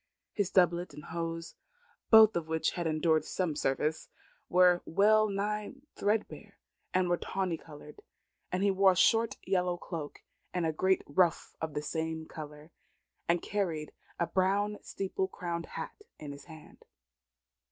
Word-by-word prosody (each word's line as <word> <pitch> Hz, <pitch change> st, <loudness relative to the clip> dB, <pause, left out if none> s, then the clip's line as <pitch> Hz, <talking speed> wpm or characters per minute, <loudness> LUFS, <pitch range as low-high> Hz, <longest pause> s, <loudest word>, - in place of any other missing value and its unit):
His 205 Hz, -4 st, 0 dB
doublet 175 Hz, -4 st, +2 dB
and 150 Hz, -, -10 dB
hose, 165 Hz, +1 st, -4 dB, 0.6 s
both 220 Hz, -1 st, +8 dB
of 170 Hz, -2 st, -2 dB
which 160 Hz, 0 st, 0 dB
had 175 Hz, -2 st, -2 dB
endured 155 Hz, 0 st, +2 dB
some 180 Hz, -5 st, -2 dB
service, 145 Hz, +3 st, -1 dB, 0.4 s
and -, -, -9 dB
were 180 Hz, -1 st, +6 dB
well 215 Hz, +4 st, +4 dB
nigh 210 Hz, +3 st, -2 dB, 0.2 s
threadbare, 210 Hz, +1 st, -2 dB, 0.4 s
were 180 Hz, -1 st, +2 dB
tawny 185 Hz, -2 st, -2 dB
coloured; 150 Hz, -1 st, -13 dB, 0.5 s
and 185 Hz, +2 st, 0 dB
he 200 Hz, -, +4 dB
wore 190 Hz, 0 st, +5 dB
a -, -, -7 dB
short 225 Hz, +5 st, +3 dB
yellow 180 Hz, -2 st, +1 dB
cloak, 165 Hz, -5 st, -7 dB, 0.3 s
a 165 Hz, -3 st, 0 dB
great 190 Hz, +4 st, +2 dB
ruff 170 Hz, +3 st, +1 dB
of 160 Hz, -2 st, -4 dB
the 150 Hz, -, -2 dB
same 160 Hz, +1 st, -3 dB
colour, 150 Hz, 0 st, -10 dB, 0.6 s
and 170 Hz, 0 st, +2 dB
carried 170 Hz, -7 st, -2 dB, 0.3 s
a 170 Hz, -, +2 dB
brown 200 Hz, +3 st, +1 dB
steeple 190 Hz, -1 st, -3 dB
crowned 170 Hz, -2 st, -5 dB
hat -, -, -7 dB, 0.2 s
in 150 Hz, -2 st, -7 dB
his 140 Hz, 0 st, -11 dB
hand. 155 Hz, -2 st, -14 dB
175 Hz, 145 wpm, -31 LUFS, 160-195 Hz, 0.6 s, both